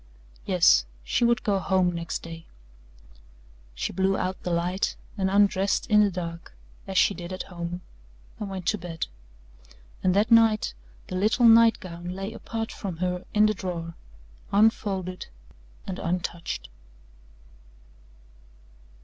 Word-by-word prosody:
Yes, - - +5 0.2
she 150 - 0
would 235 -1 +3
go 200 -2 +1
home 185 -1 +2
next 170 -1 -4
day. 165 0 -9 1.3
She - - -3
blew 190 0 +1
out 185 0 -3
the - - -4
light 175 +3 0 0.2
and 190 -3 0
undressed 200 -1 +2
in 210 0 +7
the 205 - +4
dark 170 - -6 0.3
as 190 -1 -3
she 200 - +5
did 175 -1 -8
at 185 - -4
home 175 -1 -6 0.6
and 210 - -4
went 190 -2 -6
to 210 - 0
bed. 165 -2 -4 1.0
And 185 0 +3
that 210 +4 +2
night 225 -2 +5 0.3
the 185 - -6
little 215 +6 +3
night 230 0 +7
gown 175 -1 -7
lay 195 +3 -5
apart 225 0 -5
from 185 -5 -6
her 180 +1 -2
in 210 0 +6
the 215 - +3
drawer 175 -4 -5 0.6
unfolded 195 -3 +1 0.6
and 190 -1 -5
untouched. 170 - -3
190 Hz, 135 wpm, -26 LUFS, 175-210 Hz, 1.3 s, in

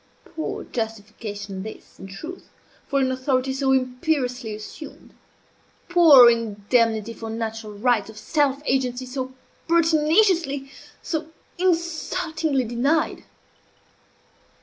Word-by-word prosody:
Poor 315 - -5
justification 210 -3 -5
this, 220 +2 -10
in 190 - -9
truth, 315 - -9 0.4
for 280 - +1
an 260 -1 +1
authority 260 0 0
so 270 0 +1
imperiously 255 -3 0
assumed! 215 +8 -11 0.8
Poor 320 -8 +8
indemnity 230 0 +1
for 225 -1 -7
natural 225 -1 -4
rights 220 0 +1
of 220 - -12
self 285 +3 0
agency 255 -1 0
so 260 0 -4 0.4
pertinaciously, 325 -3 +3 0.3
so 315 -2 -3 0.3
insultingly 330 -4 0
denied! 250 +7 0
255 Hz, 100 wpm, -23 LUFS, 225-310 Hz, 0.8 s, Poor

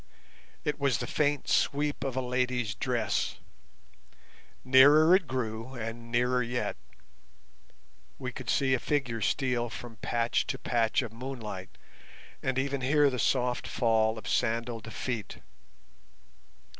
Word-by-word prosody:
It 150 0 -2
was 140 -5 +2
the - - -3
faint 145 -2 0
sweep 145 +1 +1
of 135 -2 -3
a 130 - -1
lady's 125 -3 0
dress. - - -1 1.3
Nearer 145 +6 +7
it 190 -5 +1
grew, 120 0 -4
and 115 0 -6
nearer 125 +1 +2
yet. 120 +1 -2 1.4
We 130 -2 -5
could 125 -1 -8
see 135 -1 +2
a 130 - +2
figure 120 -6 -1
steal 125 0 0
from 115 0 -9
patch 115 +2 0
to - - -2
patch 115 +2 +1
of 115 -2 -7
moonlight, 115 -6 -7 0.6
and 130 -1 -1
even 135 0 -1
hear 145 +2 +4
the 125 - -3
soft 125 -1 +1
fall 110 -2 +2
of 110 - -8
sandalled 115 -1 -1
feet. 115 -3 -4
125 Hz, 130 wpm, -29 LUFS, 115-135 Hz, 1.4 s, Nearer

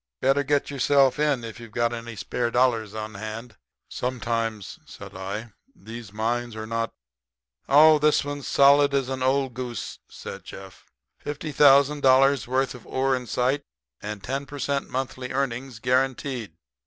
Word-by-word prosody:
Better 135 +2 +3
get 145 0 +1
in - - -6
yourself 135 +1 +3
if 130 -6 -1
you've 115 -2 -11
any 120 -1 -1
spare 120 +3 -2
dollars 115 -4 +1
on 110 0 -5
hand." 110 +3 -7 0.3
"Sometimes," 115 -4 -3
said - - -11
I, 100 +4 -6 0.2
"these 115 - -10
mines 115 +2 -2
are 110 0 -5
not 115 +1 -2 0.4
" 65 - -66 0.3
"Oh, 155 +2 +7
this 150 -1 +3
one's 145 -1 -5
solid 140 0 +5
as 135 -2 0
an 130 -1 -3
old 130 0 +1
goose," 125 -1 -6
said - - -9
Jeff. 95 -2 -12 0.3
"Fifty 145 +1 -5
thousand 140 +1 +5
dollars' 135 -1 +4
worth 130 +1 0
of 125 - -13
ore 135 0 +1
in 125 -1 -5
sight, 130 +5 0 0.4
and 105 -1 -6
10 135 +2 -3
per 145 0 -8
cent. 140 0 -2
monthly 130 -1 -4
earnings 130 -2 -2
guaranteed." 130 -1 -1
125 Hz, 155 wpm, -25 LUFS, 115-140 Hz, 0.4 s, Oh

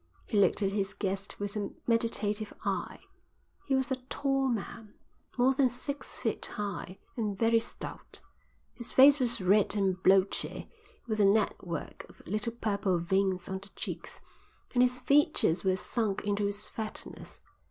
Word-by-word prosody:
He - - -5
looked 200 +1 +3
at 195 - +1
his 195 -1 -2
guest 195 0 -3
with 205 0 -4
a 205 -1 -2 0.2
meditative 220 -3 0
eye. - - -2 0.7
He 270 - +2
was 265 -1 +2
a 260 - +1
tall 270 -1 +1
man, 225 -2 -4 0.4
more 255 +2 +4
than 265 -1 +3
six 275 +4 -4
feet - - -2
high, 200 -2 -5 0.2
and 210 -4 -2
very 230 +1 +4
stout. - - -7 0.5
His 240 - -6
face 280 +2 +7
was 240 -2 +1
red 200 +3 +3
and 190 -2 0
blotchy, 190 +1 +2 0.4
with 215 -3 -2
a 205 - +5
network 195 -5 0
of - - -18
little 215 +4 -2
purple 200 -5 0
veins 185 +1 0
on 190 0 -3
the 195 +1 -14
cheeks, - - -6 0.5
and 245 - +4
his 250 0 +3
features 280 - +3
were 190 -1 +2
sunk 205 +1 -1
into 205 0 +1
its 205 +1 -4
fatness. 220 -1 -6
210 Hz, 155 wpm, -30 LUFS, 195-240 Hz, 0.7 s, face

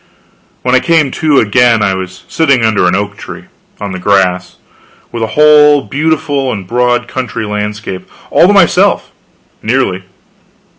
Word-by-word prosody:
When 125 - 0
I 130 - +5
came 160 -4 +1
to 155 -1 0
again, 115 0 +2
I 95 - +1
was 95 0 -7
sitting 140 -8 +1
under 105 -5 +1
an 90 - +1
oak 100 +1 -3
tree, - - -10 0.4
on 100 -1 -5
the 95 - -6
grass, 90 -2 0 0.6
with 115 - -5
a 110 - 0
whole 150 -1 +5
beautiful 145 -2 -1
and 100 -5 -6
broad 120 +3 0
country 125 -4 -5
landscape 105 -2 -5 0.2
all - - +4
to - - +3
myself - - +2 0.5
nearly. 110 -6 -1
115 Hz, 150 wpm, -11 LUFS, 100-140 Hz, 0.6 s, I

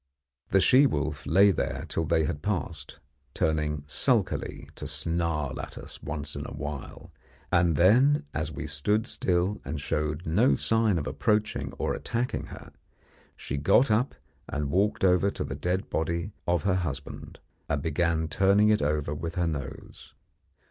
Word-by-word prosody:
The 95 - +4
she 130 +8 +6
wolf 75 - -3
lay 100 +7 +6
there 90 - -2
till 80 - -1
they 80 +1 +2
had 75 -1 -3
passed, 85 -7 -3 0.4
turning 75 -2 0
sulkily 75 - -1
to - - -7
snarl 80 -5 -1
at - - -9
us - - -9
once 75 0 -5
in - - -4
a - - -8
while, 75 -2 -7 0.4
and 85 -2 +3
then, 130 - +4
as 75 +1 -2
we 75 - -5
stood 105 - 0
still 95 -2 0
and 75 +3 -4
showed 75 +3 -2
no 105 +12 +3
sign 110 -4 +2
of 75 - -2
approaching 105 0 0
or - - -2
attacking 120 +2 -2
her, - - -11 0.6
she 70 - -5
got 100 - +4
up 115 +5 +1 0.3
and 75 -1 -2
walked 100 +1 +2
over 90 +2 +4
to - - -4
the - - -5
dead 90 +2 -2
body 85 +4 -1 0.2
of 85 0 +1
her 95 -2 +2
husband, 70 -6 -5 0.3
and 70 -1 -1
began 80 0 0
turning 100 +5 +4
it 105 - +3
over 75 0 0
with 80 +3 -5
her 90 - +1
nose. 70 -5 -6
85 Hz, 160 wpm, -27 LUFS, 75-100 Hz, 0.6 s, she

